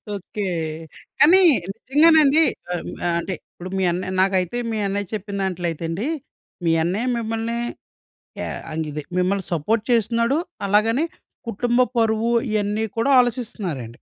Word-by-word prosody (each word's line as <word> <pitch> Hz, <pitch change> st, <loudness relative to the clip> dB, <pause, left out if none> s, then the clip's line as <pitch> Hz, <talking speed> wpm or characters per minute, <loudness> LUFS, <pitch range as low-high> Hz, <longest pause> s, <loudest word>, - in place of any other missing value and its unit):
Okay. 200 Hz, +1 st, -5 dB, 0.7 s
కానీ 360 Hz, +6 st, +7 dB, 0.3 s
నిజంగానండి, 310 Hz, +3 st, +5 dB, 0.3 s
ఆహ్, 175 Hz, -, -2 dB
హ్మ్, -, -, -6 dB, 0.3 s
అంటే, 185 Hz, +2 st, -3 dB, 0.2 s
ఇప్పుడు 180 Hz, +1 st, -9 dB
మీ 190 Hz, -, +1 dB
అన్నయ్య 185 Hz, +2 st, -3 dB
నాకైతే 190 Hz, +3 st, +1 dB
మీ 220 Hz, -, -2 dB
అన్నయ్య 200 Hz, 0 st, -2 dB
చెప్పిన 205 Hz, -1 st, -4 dB
దాంట్లో 180 Hz, -2 st, -2 dB
అయితే 165 Hz, +1 st, -6 dB
అండీ, 200 Hz, -, -2 dB, 0.6 s
మీ 165 Hz, -, +3 dB
అన్నయ్య 200 Hz, +9 st, -1 dB
మిమ్మల్నీ 225 Hz, +1 st, -2 dB, 0.8 s
యా -, -, -3 dB, 0.2 s
అంగిదే 155 Hz, -1 st, -3 dB, 0.2 s
మిమ్మల్ని 190 Hz, +1 st, +1 dB
సపోర్ట్ 210 Hz, +8 st, 0 dB
చేస్తున్నాడు, 235 Hz, +4 st, +2 dB, 0.3 s
అలాగనే 225 Hz, +8 st, +3 dB, 0.4 s
కుటుంబ 240 Hz, +3 st, +1 dB, 0.2 s
పరువు, 225 Hz, +1 st, +2 dB, 0.2 s
ఇయన్నీ 210 Hz, +1 st, 0 dB
కూడా 275 Hz, +5 st, +3 dB
ఆలోచిస్తన్నారండి. 220 Hz, -, -2 dB
215 Hz, 130 wpm, -22 LUFS, 185-235 Hz, 0.8 s, కానీ